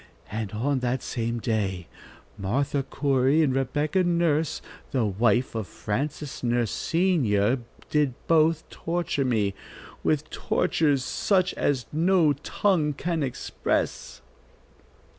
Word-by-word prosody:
And 110 -1 -3
on 130 +5 0
that 125 +1 -1
same 115 0 -2
day 100 -6 -1 0.5
Martha 135 +8 0
Corey 135 +2 +2
and 135 -4 +2
Rebecca 145 +7 +1
Nurse, 170 -3 +1 0.3
the 125 -4 +1
wife 115 +5 +2
of 110 -4 -3
Francis 140 +6 -4
Nurse 120 -2 +1
senior, 135 - +2 0.3
did 145 -4 +2
both 160 0 +3
torture 165 -5 -1
me, 105 -6 +1 0.5
with 155 0 0
tortures 145 -5 +1
such 185 +3 +1
as 130 -5 0
no 165 -1 +4
tongue 155 +1 0
can 165 +3 -2
express." 130 -4 -2
140 Hz, 110 wpm, -26 LUFS, 120-155 Hz, 0.5 s, no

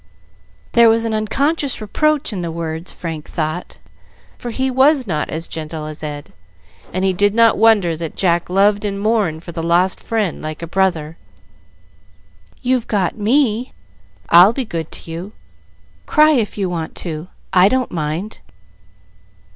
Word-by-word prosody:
There 235 -1 +6
was 225 +1 +2
an 225 - -1
unconscious 275 +7 0
reproach 285 +5 0
in 190 - -3
the 170 -1 -3
words, 165 +1 -5
Frank 160 -3 -7
thought; 155 +2 -4 0.6
for 240 - -5
he 260 +3 -1
was 265 +1 +4
not 155 -7 -2
as 165 +1 -5
gentle 155 -1 -6
as 155 -1 -8
Ed, 145 -1 -7 0.6
and 185 +1 -1
he 190 - +2
did 205 +3 +2
not 230 -1 +5
wonder 210 -6 +4
that 160 -1 -6
Jack 175 -2 +1
loved 200 +2 +3
and 200 -1 -2
mourned 200 -7 0
for 170 - -8
the 165 0 -4
lost 175 +3 +2
friend 215 -6 -2
like 155 +1 -6
a - - -2
brother. 165 -3 -1 1.5
"You've 250 -2 +1
got 195 -5 0
me. 230 +1 +1 0.6
I'll 180 +6 +8
be 260 0 -3
good 165 -6 -5
to 165 - -8
you; 180 +6 -7 0.7
cry 305 0 +5
if 235 -9 0
you 195 -2 0
want 170 -3 -4
to, 160 0 -5 0.3
I 185 +1 +6
don't 260 0 0
mind." 165 +6 -3
190 Hz, 155 wpm, -18 LUFS, 165-225 Hz, 1.5 s, I'll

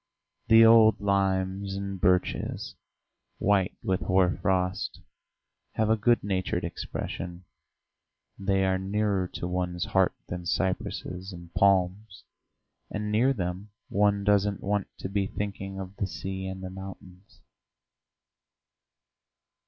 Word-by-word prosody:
The 115 0 +8
old 110 -2 +7
limes 95 -1 0
and 100 -1 -5
birches, 90 0 +1 0.6
white 100 -1 +1
with 95 -1 0
hoar 95 -1 +3
frost, 95 -1 0 0.7
have 110 0 +1
a - - +5
good 115 +2 +2
natured 95 -2 -1
expression; 90 +1 -5 0.9
they 95 -1 +1
are 95 0 +1
nearer 100 -1 0
to 90 - -4
one's 90 -1 -2
heart - - +2
than 90 0 -5
cypresses 95 +1 -2
and 85 -1 -11
palms, 95 +1 +2 0.7
and 105 0 -3
near 120 +6 +4
them 95 -3 -3 0.2
one 100 0 +2
doesn't 100 0 +2
want 100 0 0
to - - -5
be 100 0 0
thinking 95 -1 -5
of 95 +1 -7
the 100 - -1
sea 95 +2 -5
and 95 0 -6
the 95 - -5
mountains. 95 0 -11
95 Hz, 120 wpm, -28 LUFS, 95-100 Hz, 0.9 s, The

